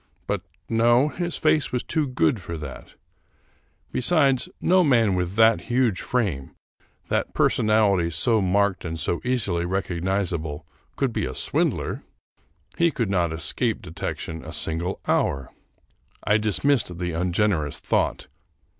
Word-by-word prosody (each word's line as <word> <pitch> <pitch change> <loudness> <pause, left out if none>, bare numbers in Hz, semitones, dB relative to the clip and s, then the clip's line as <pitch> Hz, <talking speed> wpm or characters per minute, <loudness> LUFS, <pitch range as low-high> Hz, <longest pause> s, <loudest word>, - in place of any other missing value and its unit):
But - - -2 0.3
no, 120 +5 +3
his 175 +2 -3
face 155 -2 +2
was 125 - -1
too 155 -3 -1
good 110 -4 +1
for 85 -1 -6
that; 75 -4 -9 1.0
besides, 135 -2 +2
no 185 +1 +4
man 115 - +3
with 90 +1 -2
that 115 +1 +5
huge 120 -5 +1
frame, 95 - -2 0.5
that - - -1
personality 105 -6 +3
so 110 +6 +2
marked 95 +1 +1
and 80 -2 -4
so 85 +2 -1
easily 115 -9 0
rec 95 +3 -2
ognizable, 85 -4 -2 0.3
could 130 -4 -1
be - - -1
a - - -6
swindler; - - -1 0.8
he 170 0 +5
could 115 -9 -2
not 85 -4 +1
escape 80 0 -1
detec - - -4
tion 80 0 -7
a 80 - -8
single 80 +4 -3
hour. 70 -2 0 0.7
I 105 - +3
dismissed 110 -2 +1
the 90 0 -2
ungenerous 85 -2 0
thought. - - -1
100 Hz, 135 wpm, -24 LUFS, 85-125 Hz, 1.0 s, that